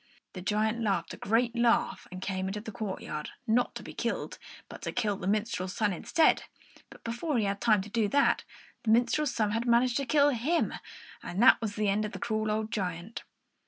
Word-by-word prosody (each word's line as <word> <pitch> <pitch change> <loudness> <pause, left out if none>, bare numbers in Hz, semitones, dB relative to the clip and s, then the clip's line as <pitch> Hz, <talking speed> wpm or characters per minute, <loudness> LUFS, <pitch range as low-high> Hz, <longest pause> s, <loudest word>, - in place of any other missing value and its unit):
The 185 - -7
giant 215 +4 0
laughed 195 -6 0
a - - -6
great 230 +3 +1
laugh 235 0 +2
and 185 +1 -7
came 190 -1 -2
out - - -2
into - - -5
the 220 - -7
courtyard, 190 -7 -5 0.2
not 240 +1 +1
to - - -6
be - - -9
killed, - - -3 0.3
but - - -11
to - - -3
kill 215 -4 0
the 185 - -5
minstrel's 205 -3 -1
son 210 -3 +1
instead; 315 - +2 0.4
but - - -15
before 240 +5 -2
he 220 - +1
had 200 0 -2
time 215 -5 +3
to - - -9
do 220 -1 +1
that, 280 +6 +3 0.4
the 225 - -3
minstrel's 240 +6 +2
son 215 -3 +1
had 230 +3 -1
managed 240 +1 +3
to 275 -2 -2
kill 290 -1 +5
him, 285 +7 0 0.5
and 190 +6 -1
there 260 - +9
was 215 -2 -3
an 215 - +1
end 205 +1 +2
of 210 - -6
the - - -6
cruel 215 -1 -1
old 215 +1 -1
giant. 180 +2 -4
220 Hz, 215 wpm, -29 LUFS, 200-240 Hz, 0.5 s, there